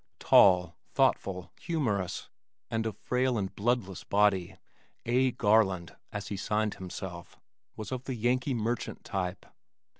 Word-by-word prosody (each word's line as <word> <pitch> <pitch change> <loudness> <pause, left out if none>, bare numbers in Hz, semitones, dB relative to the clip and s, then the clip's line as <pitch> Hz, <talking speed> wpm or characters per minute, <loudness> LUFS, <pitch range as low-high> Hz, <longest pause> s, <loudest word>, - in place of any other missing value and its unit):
Tall, 90 -3 +5 0.2
thoughtful, 90 -2 +1
humorous 110 - -2 0.4
and 115 0 0
of 105 -2 -5
frail 125 -1 0
and 95 -2 -3
bloodless 105 -4 -1
body, 95 -3 +2 0.5
"A. 125 +2 +3
Garland" 105 -7 +2 0.2
as 100 -2 -5
he 100 - -3
signed 105 +1 0
himself, 90 -1 -8 0.4
was 110 -2 -7
of 130 -1 -4
the 130 - -3
Yankee 125 +3 +1
merchant 115 +1 -2
type. 90 -1 -3
105 Hz, 125 wpm, -30 LUFS, 95-120 Hz, 0.5 s, Tall